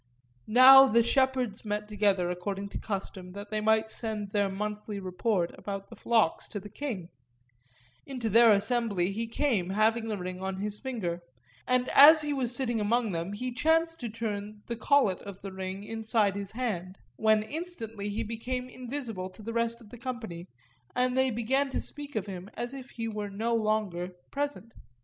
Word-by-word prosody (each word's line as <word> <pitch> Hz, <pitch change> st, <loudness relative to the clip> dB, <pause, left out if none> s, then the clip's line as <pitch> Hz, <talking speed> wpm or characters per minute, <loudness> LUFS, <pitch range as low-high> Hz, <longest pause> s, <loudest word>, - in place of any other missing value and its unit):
Now 265 Hz, +3 st, +9 dB
the 235 Hz, -1 st, +4 dB
shepherds 255 Hz, -3 st, +1 dB
met 210 Hz, 0 st, -3 dB
together, 200 Hz, -4 st, +1 dB
according 195 Hz, +2 st, -4 dB
to -, -, -5 dB
custom, 190 Hz, -3 st, -5 dB
that 205 Hz, +1 st, -8 dB
they 215 Hz, 0 st, -1 dB
might 220 Hz, 0 st, +2 dB
send 215 Hz, -3 st, -3 dB
their 205 Hz, -1 st, +1 dB
monthly 210 Hz, +1 st, -4 dB
report 185 Hz, -1 st, -1 dB
about 195 Hz, -1 st, -6 dB
the -, -, -9 dB
flocks 225 Hz, -8 st, +1 dB
to 205 Hz, -, -4 dB
the 205 Hz, +1 st, -11 dB
king; 215 Hz, -11 st, -5 dB, 1.0 s
into 255 Hz, -4 st, -3 dB
their 230 Hz, +2 st, +7 dB
assembly 205 Hz, -3 st, +1 dB
he 225 Hz, +3 st, -3 dB
came 225 Hz, -7 st, 0 dB
having 220 Hz, +3 st, +2 dB
the 215 Hz, -2 st, -2 dB
ring 185 Hz, 0 st, -6 dB
on 190 Hz, 0 st, -3 dB
his 210 Hz, +1 st, -3 dB
finger, 195 Hz, -10 st, -3 dB, 0.5 s
and 250 Hz, 0 st, +2 dB
as 305 Hz, +2 st, +9 dB
he 295 Hz, -1 st, -1 dB
was 250 Hz, -3 st, -1 dB
sitting 240 Hz, -4 st, 0 dB
among 225 Hz, +1 st, +1 dB
them 170 Hz, +3 st, -3 dB
he 250 Hz, +4 st, -4 dB
chanced 325 Hz, +4 st, +2 dB
to 240 Hz, -, -4 dB
turn 210 Hz, -1 st, -5 dB
the 235 Hz, -, -4 dB
collet 230 Hz, -5 st, +3 dB
of 200 Hz, -1 st, -9 dB
the 195 Hz, -, -5 dB
ring 190 Hz, +1 st, -5 dB
inside 220 Hz, -2 st, 0 dB
his 200 Hz, 0 st, -5 dB
hand, 195 Hz, -7 st, -3 dB, 0.2 s
when 215 Hz, -1 st, +3 dB
instantly 225 Hz, -, -5 dB
he 215 Hz, +3 st, -2 dB
became 245 Hz, +3 st, -4 dB
invisible 245 Hz, -7 st, -5 dB
to 200 Hz, +3 st, -14 dB
the 230 Hz, +2 st, -5 dB
rest 235 Hz, 0 st, -1 dB
of 215 Hz, -, -16 dB
the 245 Hz, -, -10 dB
company 225 Hz, -9 st, -6 dB, 0.5 s
and 250 Hz, 0 st, +1 dB
they 260 Hz, 0 st, +3 dB
began 260 Hz, +4 st, 0 dB
to -, -, -2 dB
speak 290 Hz, -1 st, -7 dB
of 210 Hz, -3 st, -1 dB
him 190 Hz, -1 st, -7 dB
as 240 Hz, +2 st, -4 dB
if 260 Hz, -2 st, -8 dB
he 230 Hz, -1 st, -5 dB
were 210 Hz, -2 st, -4 dB
no 220 Hz, +4 st, -1 dB
longer 210 Hz, -5 st, -1 dB, 0.2 s
present. 285 Hz, -5 st, -3 dB
220 Hz, 180 wpm, -29 LUFS, 200-245 Hz, 1.0 s, Now